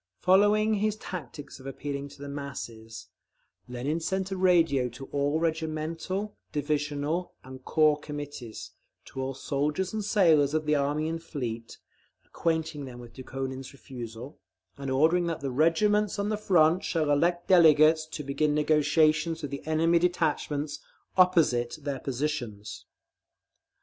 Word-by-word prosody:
Following 205 +3 +4
his 215 0 0
tactics 145 - -8
of 130 - -10
appealing 140 +1 -5
to 140 - -12
the - - -6
masses, 120 -6 -7 0.6
Lenin 130 +6 -2
sent 190 +3 -2
a - - -1
radio 165 -9 +3
to 125 +3 -10
all 145 +2 0
regimental, 165 +5 -2 0.2
divisional 145 +3 -2
and 130 0 -11
corps 155 0 +3
Committees, 145 -6 -7 0.3
to 135 - -6
all 135 0 -3
soldiers 150 +8 -2
and 215 -1 -2
sailors 160 -8 +3
of 155 0 0
the 150 - +2
Army 145 +2 0
and 165 +1 -3
the - - -20
Fleet, 115 -8 -5 0.5
acquainting 160 -3 -2
them 125 -2 -9
with 120 -1 -12
Dukhonin's 130 0 -6
refusal, 120 0 -9 0.4
and 140 -1 -6
ordering 160 +6 +3
that 165 -3 -3
"the 135 -1 -3
regiments 195 +9 +2
on 200 +1 -1
the 215 - 0
front 180 -4 +3
shall 155 -3 0
elect 175 +4 +1
delegates 155 -3 +6
to 155 -1 -6
begin 145 +2 0
negotiations 155 +2 +2
with 145 - -4
the 140 - -5
enemy 165 +2 +3
detachments 155 -4 -1 0.4
opposite 160 -10 +3
their 140 -2 -4
positions…." 125 -6 -4
150 Hz, 140 wpm, -28 LUFS, 140-165 Hz, 0.6 s, delegates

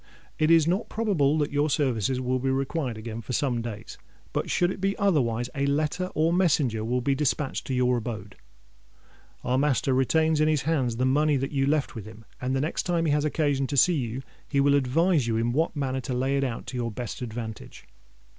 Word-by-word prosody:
"It 155 - +3
is 165 -2 +6
not 185 +5 0
probable 170 -10 +1
that 145 -2 0
your 145 +2 +1
services 130 -4 0
will 130 0 -1
be 135 +1 -1
required 135 -2 -1
again 110 +1 -6
for 120 +3 -6
some 125 -3 0
days: 110 -3 -7 0.3
but - - -2
should 175 0 +2
it 185 - -7
be 195 +1 0
otherwise, 125 - +1
a 140 -1 -1
letter 155 +6 0
or 160 +2 +2
a - - +1
messenger 145 -11 +2
will 125 +3 0
be 140 +3 +1
dispatched 145 0 -1
to 130 - -1
your 125 0 +2
abode. 105 -4 -6 1.1
Our 125 +1 +1
master 135 -2 +1
retains 155 +4 +2
in 155 - +4
his 150 -4 +1
hands 135 -7 0
the 125 +2 0
money 145 +2 +3
that 135 +1 -3
you 135 -2 +1
left 150 0 0
with 110 -5 -7
him; 110 +1 -12 0.2
and 130 +1 -1
the 135 - 0
next 155 - -1
time 170 -2 0
he 155 - +2
has 150 +1 +1
occasion 145 -3 0
to 140 - -3
see 180 +7 +5
you, 130 -3 -3 0.2
he 140 - 0
will 140 0 +4
advise 145 +2 +2
you 115 -1 0
in 115 +1 0
what 160 +5 0
manner 135 -2 -2
to 125 0 -4
lay 130 +2 0
it 140 - +1
out 125 -4 -3
to 130 - -5
your 120 -1 -1
best 120 +3 -6
advantage. 115 -2 -7
135 Hz, 220 wpm, -26 LUFS, 125-155 Hz, 1.1 s, is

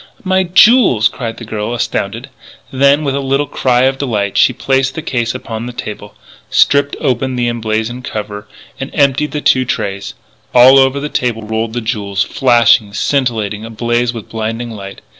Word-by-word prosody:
"My 190 -1 +2
jewels!" 190 - +5
cried 115 -3 -6
the 120 - -9
girl, 110 +2 -4
astounded. 120 - -3 0.4
Then, 140 +3 +3
with 140 -2 -1
a 140 - -1
little 135 +1 0
cry 125 -3 +1
of 135 0 +1
delight, 105 -7 -2
she - - +4
placed 135 +1 0
the 160 - -5
case 120 -4 -2
upon 115 +1 -6
the 125 - -7
table, 105 -3 -8 0.3
stripped 140 0 +3
open 130 -2 -1
the 120 -1 0
emblazoned 115 +1 -2
cover, 105 -3 -6 0.3
and 135 +1 -5
emptied 140 0 +2
the 150 - -3
two 130 -2 +3
trays. 100 -4 -4 0.4
All 130 +2 +8
over 135 +1 +2
the 145 - -3
table 120 -6 -2
rolled 110 +1 -3
the 120 - -2
jewels, 100 -4 -2
flashing, 115 -5 +3
scintillating, 110 -7 -1
ablaze 120 +2 -1
with 115 -4 -8
blinding 115 +1 -4
light. 100 -2 -9
120 Hz, 170 wpm, -14 LUFS, 110-135 Hz, 0.4 s, All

